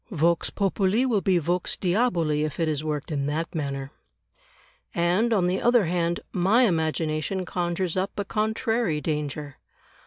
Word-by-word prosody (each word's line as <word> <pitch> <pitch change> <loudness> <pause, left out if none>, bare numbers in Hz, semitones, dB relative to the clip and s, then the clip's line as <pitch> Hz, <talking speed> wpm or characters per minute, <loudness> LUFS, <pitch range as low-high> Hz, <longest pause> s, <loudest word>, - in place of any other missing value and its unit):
Vox 170 -3 +1
populi 200 +4 +1
will 225 -6 +1
be 185 -2 +2
Vox 175 +2 -1
diaboli 175 -7 +1
if 155 +1 -4
it 165 - +1
is 150 -1 -1
worked 150 -1 -3
in 140 -2 -1
that 160 +3 -2
manner. 140 -3 -3 1.0
And, 180 +7 +2
on 195 -5 +3
the 180 +1 0
other 240 -4 +4
hand, 170 0 0
my 195 +8 +3
imagination 160 -1 0
conjures 175 0 -2
up 190 +1 0
a 200 - -1
contrary 220 -4 0
danger. 150 -2 -3
175 Hz, 150 wpm, -25 LUFS, 155-195 Hz, 1.0 s, other